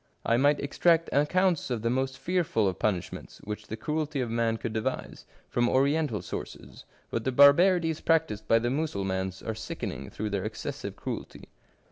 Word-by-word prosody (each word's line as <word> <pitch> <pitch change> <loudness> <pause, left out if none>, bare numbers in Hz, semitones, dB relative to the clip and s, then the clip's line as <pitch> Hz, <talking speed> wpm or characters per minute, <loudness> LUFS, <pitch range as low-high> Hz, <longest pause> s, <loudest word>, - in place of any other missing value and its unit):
I 115 - +3
might 145 +4 +3
extract 165 +4 +2
accounts 175 +4 +2
of 120 -3 -2
the 115 - +1
most 130 +1 -1
fearful 170 - +1
of 95 - -2
punishments 95 -5 -2
which 105 0 -6
the 110 - -5
cruelty 150 +2 -2
of 120 -3 -2
man 115 -1 +1
could 110 -1 -4
devise, 110 0 -4 0.2
from 120 0 +1
Oriental 140 -3 +1
sources, - - -8 0.3
but 115 - -1
the 130 - 0
barbarities 160 +4 +5
practised 160 -11 +1
by 115 - +5
the 120 +1 0
Mussulmans 95 - -2
are 110 - -2
sickening 70 - -5
through 105 0 -4
their 100 -2 -1
excessive - - -5
cruelty. - - -7
125 Hz, 165 wpm, -28 LUFS, 110-155 Hz, 0.3 s, barbarities